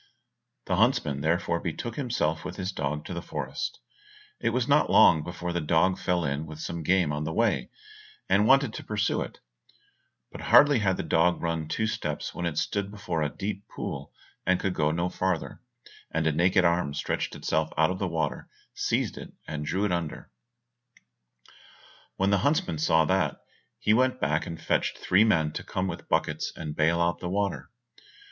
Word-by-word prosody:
The - - 0
huntsman 70 -1 +2
therefore 85 +2 +1
betook 100 +8 -4
himself 115 - -1
with 90 0 -6
his 95 0 -3
dog 75 -3 -3
to - - -5
the 85 - -4
forest. - - -4 0.6
It - - +1
was 125 +1 0
not 145 +1 +4
long 80 -2 +6
before 90 +1 -4
the 85 - -1
dog 80 +4 +2
fell 90 -2 0
in 70 +3 -2
with 75 0 -9
some 85 +1 -4
game 90 -2 +2
on 75 +1 -2
the 80 - -3
way, - - +1 0.6
and 100 +3 +3
wanted 135 -3 +4
to - - -6
pursue 105 -2 0
it; - - -7 0.9
but - - -9
hardly 145 -3 +6
had 95 -3 +1
the - - -2
dog 85 +2 +2
run 80 -2 -1
two 110 +7 -1
steps 110 - -3
when 85 - -2
it 75 -3 -4
stood 100 +4 -1
before 90 -5 -3
a 75 - +1
deep 100 +4 -5
pool, - - -6 0.5
could 95 0 -1
go 75 -3 +1
no 85 +3 0
farther, 90 -2 -2 0.5
and 80 0 -1
a 80 - +3
naked 90 +4 +3
arm 85 -4 +1
stretched - - -2
itself 80 0 -1
out 80 +3 +4
of 95 - -4
the 100 - 0
water, 80 -6 -2 0.2
seized - - -1
it, - - -9 0.2
and 75 -1 -4
drew 95 +7 0
it 105 - 0
under, 85 -3 -3 1.8
When 95 +1 +1
the 100 - +3
huntsman 140 - +1
saw 80 +1 +3
that, 95 +4 +1 0.4
he 105 - +2
went 130 +2 +2
back 75 +2 0
and 85 -1 -6
fetched - - 0
three 95 +4 +4
men 80 -9 +2
to - - -6
come 95 0 -2
with - - -6
buckets - - 0
and 75 -2 -6
bale 85 +2 +2
out 85 0 +1
the 90 - -4
water. 100 +1 -2
85 Hz, 185 wpm, -27 LUFS, 80-100 Hz, 1.8 s, long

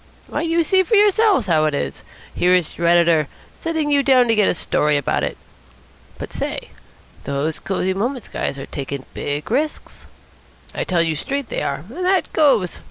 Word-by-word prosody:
Why, - - -3
you 335 0 +1
see 375 +4 +3
for 375 +4 +1
yourselves 415 - +4
how 160 -4 +2
it 150 -2 0
is. 70 - -4 0.3
Here 180 +1 +3
is 175 -4 -1
your 170 - -1
editor 170 -3 +4 0.3
sending 320 -3 -2
you 285 -1 +4
down 260 -3 +4
to - - +4
get 210 -2 +3
a - - +1
story 150 -2 +1
about 140 - 0
it. - - -3 0.8
But, - - -8
say, - - -4 0.6
those 140 +3 -2
Cosy 190 -1 -1
Moments 240 +5 -3
guys - - -3
are 135 - -6
taking 140 -1 -6
big 145 +6 -4
risks. 300 +5 -2 0.7
I - - -3
tell 175 -2 +2
you 165 -1 0
straight 275 - -3
they - - -3
are, 140 +3 -3
and 285 - -6
that 370 0 +1
goes. 250 - +2
195 Hz, 185 wpm, -20 LUFS, -, 0.8 s, yourselves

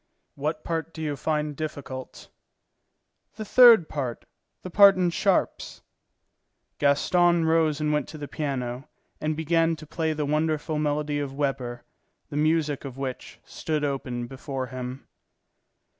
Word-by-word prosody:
"What 155 +2 -3
part 165 0 -3
do 160 - -6
you 150 -2 -2
find 150 +1 -2
difficult?" 140 -4 -7 1.1
"The 215 0 -6
third 230 -7 +7
part, 130 -5 -4 0.4
the 185 - -7
part 200 +1 +8
in 180 -2 +1
sharps." - - 0 1.0
Gaston 170 +4 +3
rose 160 -2 +2
and 150 0 0
went 150 - 0
to 155 - -9
the 145 -1 -6
piano, 135 -2 -4 0.3
and 155 0 -2
began 165 +1 +2
to 155 - -11
play 160 +1 -2
the 150 -1 -2
wonderful 155 +1 0
melody 150 0 -1
of 140 -2 -4
Weber, 135 -4 -2 0.5
the - - -5
music 155 -1 +1
of 135 -2 -8
which 135 -2 -6
stood 155 -2 -3
open 130 -4 -2
before 135 +1 -5
him. 125 +1 -7
150 Hz, 140 wpm, -26 LUFS, 135-160 Hz, 1.1 s, part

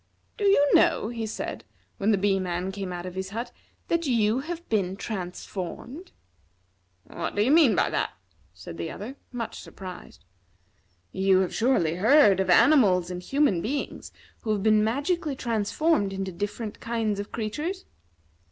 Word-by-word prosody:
"Do 415 - -2
you 390 -8 +5
know," 215 - +4
he 230 -2 -4
said, 215 - -5 0.3
when 205 - 0
the 210 - +4
Bee 195 0 +2
man 180 0 -2
came 195 -2 -5
out 175 0 -5
of 180 - -6
his 190 +1 -4
hut, 235 +4 -5 0.4
"that 335 -2 0
you 230 -1 +2
have 340 +4 -6
been 195 -4 0
transformed?" 195 - -6 0.9
"What - - -5
do 205 - +3
you 255 - +2
mean 300 - +6
by - - +2
that?" - - 0 0.4
said 90 -2 -10
the 85 - -3
other, 230 +7 -7 0.2
much 235 -3 -5
surprised. 185 - -10 0.9
"You 190 0 +3
have 185 - -2
surely 180 -10 +1
heard 215 -2 +5
of 190 -1 0
animals 185 - +5
and 180 0 -5
human 270 - +1
beings 275 +8 -4 0.3
who 220 - -2
have 200 -2 -2
been 215 -1 +4
magically 285 +6 -1
transformed 230 0 0
into 190 0 -3
different 205 +4 -5
kinds 225 -3 -1
of 205 - -6
creatures?" 300 - -4
215 Hz, 160 wpm, -26 LUFS, 190-265 Hz, 0.9 s, mean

